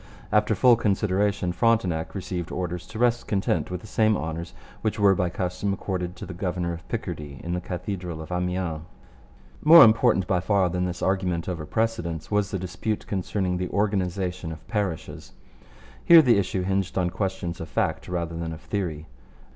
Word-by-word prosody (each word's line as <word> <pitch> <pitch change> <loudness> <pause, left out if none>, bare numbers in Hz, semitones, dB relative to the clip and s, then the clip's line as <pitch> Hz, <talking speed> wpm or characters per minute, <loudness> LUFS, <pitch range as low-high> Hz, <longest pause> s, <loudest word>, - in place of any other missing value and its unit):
After 105 +1 +3
full 120 +3 +5
consideration 100 -2 +1
Frontenac 90 -5 +1
received 90 -2 -4
orders 90 -1 -4
to 110 - -9
rest 120 0 +1
content 100 -2 0
with 90 -1 -4
the - - -13
same 110 0 +2
honours 80 +2 -5 0.3
which 110 0 -1
were 100 -1 +6
by 90 -2 0
custom 90 +3 -2
accorded 90 -2 -3
the 95 - -8
governor 90 -1 -2
of 85 +2 -10
Picardy 75 - -5
in 85 - -3
the 90 - -2
cathedral 90 -2 -5
of 80 +2 -8
Amiens. 90 -3 -2 0.8
More 165 +1 +10
important 110 -3 +4
by 90 -1 +1
far 95 0 +2
than 90 +1 -1
this 90 -1 -4
argument 90 -3 0
over 85 -5 -4
precedence 110 -8 -2
was 105 -2 +1
the 100 - -2
dispute 95 +4 -3
concerning 95 -1 -1
the 90 0 -3
organization 95 -4 -1
of 80 -5 -10
parishes. 100 -6 -4 0.7
Here 165 -2 +9
the 120 -6 +4
issue 95 -1 -1
hinged 95 0 -1
on 90 -2 +1
questions 95 -4 -3
of 80 - -6
fact - - -1
rather 85 -2 -3
than 80 0 -4
of 80 - -10
theory. 85 -7 -3
90 Hz, 170 wpm, -25 LUFS, 85-100 Hz, 0.8 s, More